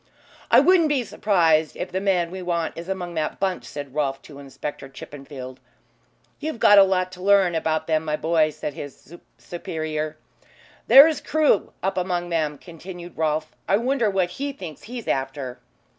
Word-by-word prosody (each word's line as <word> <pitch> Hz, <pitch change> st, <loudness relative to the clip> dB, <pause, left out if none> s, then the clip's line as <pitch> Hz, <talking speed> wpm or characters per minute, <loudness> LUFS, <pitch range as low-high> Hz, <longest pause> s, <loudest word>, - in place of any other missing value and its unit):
"I -, -, +7 dB
wouldn't 350 Hz, -4 st, +4 dB
be 280 Hz, -4 st, +1 dB
surprised 165 Hz, -8 st, +2 dB
if 180 Hz, -, -5 dB
the 190 Hz, +1 st, -2 dB
man 180 Hz, -4 st, +1 dB
we 190 Hz, 0 st, -6 dB
want 170 Hz, -2 st, -2 dB
is 170 Hz, +2 st, -8 dB
among 180 Hz, -2 st, -4 dB
that 155 Hz, -2 st, -3 dB
bunch," 190 Hz, -2 st, -1 dB
said 145 Hz, -2 st, -8 dB
Rolfe 140 Hz, -2 st, -1 dB
to 140 Hz, -2 st, -12 dB
Inspector 140 Hz, 0 st, -7 dB
Chippenfield. 135 Hz, -2 st, -10 dB, 0.8 s
"You've 310 Hz, -5 st, -4 dB
a 205 Hz, -1 st, +8 dB
lot 185 Hz, -1 st, 0 dB
to 180 Hz, 0 st, -11 dB
learn 195 Hz, -2 st, +4 dB
about 160 Hz, -1 st, -1 dB
them, 160 Hz, -1 st, +1 dB
my 155 Hz, -1 st, -1 dB
boy," 160 Hz, 0 st, +2 dB
said 150 Hz, -1 st, -6 dB
his 145 Hz, 0 st, -10 dB, 0.2 s
superior. 155 Hz, -2 st, -4 dB, 0.7 s
"There 275 Hz, +3 st, +10 dB
is 320 Hz, -, -2 dB
Crewe 305 Hz, -9 st, +2 dB
up 190 Hz, 0 st, 0 dB
among 175 Hz, -1 st, -2 dB
them," 155 Hz, -3 st, 0 dB
continued 175 Hz, +2 st, -10 dB
Rolfe. 155 Hz, -1 st, -1 dB
"I 195 Hz, -, +3 dB
wonder 240 Hz, -1 st, +1 dB
what 190 Hz, -3 st, 0 dB
he 280 Hz, +6 st, -4 dB
thinks 175 Hz, -, -9 dB
he's 240 Hz, +1 st, -7 dB
after." 135 Hz, -1 st, -3 dB
170 Hz, 170 wpm, -23 LUFS, 155-195 Hz, 0.8 s, There